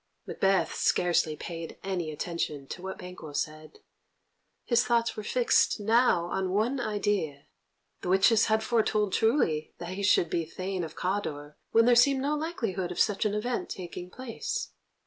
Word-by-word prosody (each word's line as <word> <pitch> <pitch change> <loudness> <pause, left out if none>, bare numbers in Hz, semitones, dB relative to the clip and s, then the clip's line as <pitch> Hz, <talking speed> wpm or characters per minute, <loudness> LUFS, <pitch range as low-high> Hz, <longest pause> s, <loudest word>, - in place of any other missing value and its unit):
Macbeth 195 -4 +1
scarcely 170 -3 +2
paid 165 +1 -7
any 185 -4 -2
attention 155 -2 -3
to 175 - -6
what 190 0 -6
Banquo 180 -4 -9
said. 155 +1 -5 0.8
His 240 -1 +3
thoughts 235 -1 +1
were - - -4
fixed 240 +1 +2
now 220 -4 +3
on 190 +1 -2
one 220 +8 +1
idea. 205 -10 -1 0.6
The - - -4
witches 200 +4 +5
had 220 0 +2
foretold 215 -3 +1
truly 220 - +1
that 175 - -7
he 195 - -5
should 185 -4 +3
be 170 - 0
Thane 185 +3 -4
of 160 -1 -7
Cawdor 155 -6 -3 0.2
when 230 0 +5
there 245 - +6
seemed 265 +3 +5
no 290 +2 0
likelihood 225 - -3
of 175 - -5
such 205 0 +2
an 210 -1 +1
event 240 +3 -2
taking 180 0 -7
place. 255 +4 -4
195 Hz, 160 wpm, -28 LUFS, 170-225 Hz, 0.8 s, there